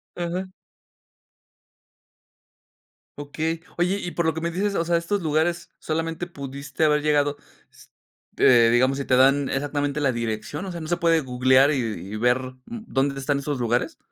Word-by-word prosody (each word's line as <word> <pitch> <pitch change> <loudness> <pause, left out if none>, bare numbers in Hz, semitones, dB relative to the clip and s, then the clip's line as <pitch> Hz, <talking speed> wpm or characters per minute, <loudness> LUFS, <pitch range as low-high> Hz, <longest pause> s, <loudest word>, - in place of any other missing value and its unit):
Ajá. 180 +2 -4 2.6
Okey, 160 +3 -3 0.2
oye, 180 +3 +1
y 175 - -5
por 170 - -1
lo 160 - +2
que 160 - -5
me 170 - -1
dices, 200 +4 -1
o 170 - 0
sea, 170 0 +2
estos 180 +4 -2
lugares 160 +2 0
solamente 165 +2 -3
pudiste 140 -2 -5
haber 150 -1 +3
llegado, 145 -1 +2 0.3
s - - -19 0.5
eh, 120 -2 +6
digamos, 130 +3 +3
si 140 - -3
te 130 - +3
dan 135 +2 +4
exactamente 145 +1 -2
la 140 -2 +2
dirección, 115 - -4
o 190 - -5
sea, 170 -1 -6
¿no 155 - -6
se 175 +1 0
puede 165 -1 +3
googlear 130 +1 +3
y - - +1
y 105 -6 -4
ver, 125 +3 +2 0.3
mm, 230 -2 -8
dónde 135 +1 0
están 140 +1 0
esos 140 -1 -3
lugares? 120 0 -1
145 Hz, 170 wpm, -24 LUFS, 130-170 Hz, 2.6 s, eh